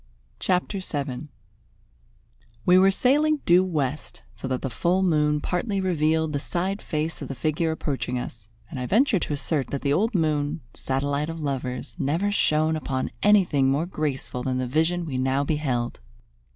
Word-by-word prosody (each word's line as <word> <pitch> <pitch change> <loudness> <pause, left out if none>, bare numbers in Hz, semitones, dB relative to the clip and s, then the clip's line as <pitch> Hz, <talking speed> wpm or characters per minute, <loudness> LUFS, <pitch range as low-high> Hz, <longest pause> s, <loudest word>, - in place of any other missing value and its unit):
CHAPTER 185 +2 0
VII 145 -5 -4 1.4
We 180 +1 +6
were 190 +1 +6
sailing 290 +8 +2
due 175 +2 +6
west, 155 -5 -3
so - - -6
that 130 -1 -2
the 135 - -1
full 175 +10 +1
moon 150 -4 +2
partly 195 +5 -1
revealed 160 -4 +1
the 145 - 0
side 185 +7 -2
face 155 +1 -3
of - - -4
the 135 - -5
figure 155 +5 0
approaching 140 -5 -2
us, 115 -3 -7 0.2
and 140 - -5
I 125 - -3
venture 225 - +3
to 150 - -2
assert 145 -2 -1
that 140 - -4
the 140 -1 +2
old 215 +8 +1
moon, 155 -2 0
satellite 140 +3 -1
of 165 0 -5
lovers, 130 -4 -3
never 165 +8 +1
shone 155 -4 +2
upon 135 -4 -2
anything 180 -10 +4
more 145 +5 +1
graceful 150 -7 -3
than 130 0 -1
the 130 - -1
vision 160 +6 +1
we 130 -5 -3
now 130 +2 +1
beheld. 135 -6 -1
155 Hz, 165 wpm, -25 LUFS, 135-180 Hz, 1.4 s, We